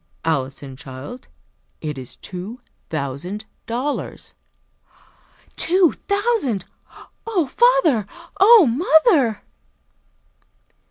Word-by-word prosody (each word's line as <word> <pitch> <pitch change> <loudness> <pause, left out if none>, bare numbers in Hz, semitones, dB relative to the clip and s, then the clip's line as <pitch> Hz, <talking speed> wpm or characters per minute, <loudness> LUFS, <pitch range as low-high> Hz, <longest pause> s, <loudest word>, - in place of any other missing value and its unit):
"Alison, 135 -3 -2
child, 135 - -10 0.5
it 150 -2 -4
is 130 -2 -7
two 195 +7 -7 0.3
thousand 155 +8 -4 0.2
dollars!" 255 +6 -4 1.2
"Two 355 0 +4 0.2
thousand! 400 - 0 0.6
Oh, 385 -8 +1
father! 325 - +3 0.3
Oh, 420 -1 +8
mother!" 295 - +3
240 Hz, 70 wpm, -21 LUFS, -, 1.2 s, Oh